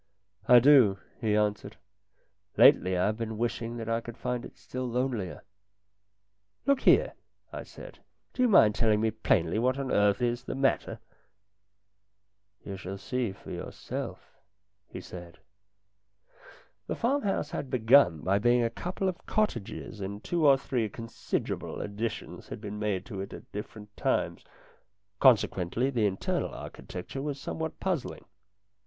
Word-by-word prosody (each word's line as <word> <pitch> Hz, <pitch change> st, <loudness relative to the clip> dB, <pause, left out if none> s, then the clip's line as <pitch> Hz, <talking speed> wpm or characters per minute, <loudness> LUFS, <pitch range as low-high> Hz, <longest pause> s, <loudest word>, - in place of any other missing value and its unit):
" 100 Hz, +4 st, -33 dB
I 125 Hz, -2 st, +9 dB
do," 120 Hz, -6 st, +6 dB, 0.2 s
he 110 Hz, -3 st, +1 dB
answered. 105 Hz, -1 st, -1 dB, 0.4 s
" -, -, -41 dB
Lately 95 Hz, 0 st, +6 dB
I 90 Hz, -, +2 dB
have 110 Hz, +1 st, 0 dB
been 110 Hz, -1 st, -4 dB
wishing 115 Hz, 0 st, -2 dB
that 115 Hz, -1 st, -5 dB
I 115 Hz, 0 st, 0 dB
could 120 Hz, 0 st, -9 dB
find 125 Hz, -1 st, -3 dB
it -, -, -11 dB
still 130 Hz, 0 st, -5 dB
lonelier." 120 Hz, -6 st, -2 dB, 0.6 s
" 100 Hz, 0 st, -49 dB
Look 280 Hz, -1 st, +3 dB
here," -, -, +4 dB, 0.4 s
I -, -, -4 dB
said, -, -, -12 dB, 0.2 s
" -, -, -47 dB
do -, -, -2 dB
you 250 Hz, -, +5 dB
mind 110 Hz, -, +6 dB
telling 110 Hz, -2 st, +2 dB
me 110 Hz, 0 st, +1 dB
plainly 105 Hz, -3 st, +1 dB
what 130 Hz, +3 st, +1 dB
on 135 Hz, -1 st, -3 dB
earth 100 Hz, -1 st, +3 dB
is 120 Hz, -1 st, -1 dB
the -, -, -4 dB
matter? 135 Hz, 0 st, 0 dB, 0.6 s
" 100 Hz, 0 st, -51 dB
" 100 Hz, 0 st, -43 dB
You 100 Hz, -1 st, -5 dB
shall 95 Hz, +1 st, -6 dB
see 125 Hz, +1 st, -2 dB
for 95 Hz, -, -11 dB
yourself," -, -, -7 dB, 0.5 s
he -, -, -8 dB
said. 85 Hz, -1 st, -10 dB, 1.5 s
The -, -, -2 dB
farmhouse 230 Hz, -, 0 dB
had 135 Hz, -, -4 dB
begun 115 Hz, -, +5 dB
by 100 Hz, +5 st, +2 dB
being 120 Hz, +2 st, +3 dB
a 115 Hz, -, 0 dB
couple 180 Hz, +8 st, -3 dB
of 185 Hz, -1 st, -4 dB
cottages 115 Hz, -, -2 dB
and 100 Hz, +2 st, -5 dB
two 170 Hz, -3 st, +2 dB
or 135 Hz, -1 st, +7 dB
three 125 Hz, -4 st, -2 dB
considerable 115 Hz, +3 st, -4 dB
additions 105 Hz, +2 st, -5 dB
had -, -, -7 dB
been 105 Hz, -1 st, -6 dB
made 100 Hz, -3 st, -1 dB
to 100 Hz, -6 st, -6 dB
it 100 Hz, -, -7 dB
at -, -, -11 dB
different 105 Hz, 0 st, -8 dB
times; -, -, -1 dB, 0.8 s
consequently, 120 Hz, -1 st, +3 dB
the 115 Hz, -5 st, +2 dB
internal 95 Hz, -1 st, -2 dB
architecture 90 Hz, +9 st, -7 dB
was 145 Hz, -1 st, -4 dB
somewhat 160 Hz, +3 st, -5 dB
puzzling. 185 Hz, -8 st, -3 dB
110 Hz, 160 wpm, -29 LUFS, 100-130 Hz, 1.5 s, I